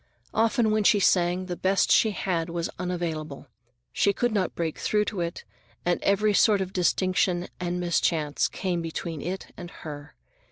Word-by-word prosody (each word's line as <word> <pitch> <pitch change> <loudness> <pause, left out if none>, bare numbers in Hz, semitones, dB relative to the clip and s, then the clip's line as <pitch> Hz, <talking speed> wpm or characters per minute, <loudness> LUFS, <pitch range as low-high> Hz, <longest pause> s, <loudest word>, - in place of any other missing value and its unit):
Often 225 0 +2
when 215 0 +2
she 205 - +5
sang, 180 -1 +2
the 180 -1 -4
best 190 +2 +1
she 220 - +5
had 180 -4 -2
was 170 0 -3
unavailable; 165 -5 -4 0.5
she 200 - +2
could 240 +4 0
not 200 -4 -1
break 165 -2 -3
through 210 0 +1
to 200 -5 -3
it, 170 0 -4 0.4
and 175 0 +1
every 205 +1 +2
sort 205 0 +4
of 190 0 -3
distraction 180 0 +1
and 180 0 -2
mischance 165 -4 +1
came 180 -3 -2
between 165 -1 -5
it 185 +4 -5
and 175 -1 -8
her. 150 -3 -9
180 Hz, 165 wpm, -26 LUFS, 170-200 Hz, 0.5 s, she